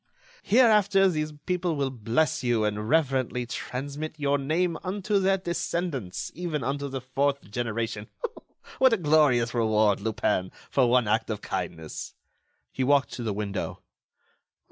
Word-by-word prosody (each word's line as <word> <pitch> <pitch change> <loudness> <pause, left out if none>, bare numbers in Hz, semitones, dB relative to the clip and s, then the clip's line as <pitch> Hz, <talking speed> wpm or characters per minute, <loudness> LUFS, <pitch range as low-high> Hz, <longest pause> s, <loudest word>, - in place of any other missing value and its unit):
Hereafter 210 -4 +5
these 155 -4 -1
people 180 -2 0
will 140 -2 -1
bless 135 +7 0
you, 120 -3 +2
and 105 +1 -2
reverently 130 -5 +1
transmit 145 +6 -5
your 145 -1 +1
name 165 +5 0
unto 200 +2 0
their 195 0 +3
descendants, 170 - -3
even 165 -4 -3
unto 140 +3 -2
the 135 -1 -4
fourth 135 -3 -1
generation. 115 -2 -3 0.7
What 260 -2 +6
a - - +3
glorious 145 - +3
reward, 110 -3 +3
Lupin, 100 -3 0 0.2
for 130 -3 +3
one 125 -2 +3
act 110 +2 +1
of 105 -2 -3
kindness!" 85 -4 -5 0.6
He 130 - -2
walked 140 +1 +3
to - - -5
the 115 -2 -1
window. 100 -1 -4
135 Hz, 140 wpm, -27 LUFS, 115-165 Hz, 0.7 s, What